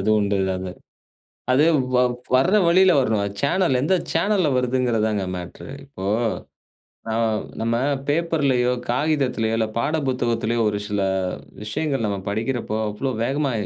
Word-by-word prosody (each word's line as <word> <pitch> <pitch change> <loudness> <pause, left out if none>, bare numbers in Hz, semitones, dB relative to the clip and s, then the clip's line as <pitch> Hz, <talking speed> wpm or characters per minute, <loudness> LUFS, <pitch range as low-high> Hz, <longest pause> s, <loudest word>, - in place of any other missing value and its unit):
அது 100 - -2
உண்டு 100 -1 +1 0.2
அது. 95 0 -5 0.8
அது 130 +4 +4 0.3
வ - - +4 0.4
வர்ற 175 +11 +3
வழில 185 +2 +5
வரணும். 110 -5 +1 0.2
சேனல், 155 -2 +2
எந்த 160 +7 +1 0.2
சேனல்ல 200 -5 +2
வருதுங்கிறது 125 -3 +1
தாங்க 105 -3 -1
மேட்டரு. 90 +9 -8
இப்போ, 95 -9 -8 1.0
ந - - -4 0.5
நம்ம 115 +1 0 0.3
பேப்பர்லயோ, 145 -6 +1 0.2
காகிதத்திலேயோ, 125 -5 0
இல்ல 110 -1 +1
பாட 155 +6 0
புத்தகத்திலேயோ 120 -2 0
ஒரு 105 -1 -2
சில 105 -1 -1 0.6
விஷயங்கள் 135 +3 -2
நம்ம 100 -1 -2
படிக்கிறப்போ, 110 0 -2
அவ்ளோ 130 +6 -3
வேகமா 140 +2 0
125 Hz, 125 wpm, -22 LUFS, 110-145 Hz, 1.0 s, வழில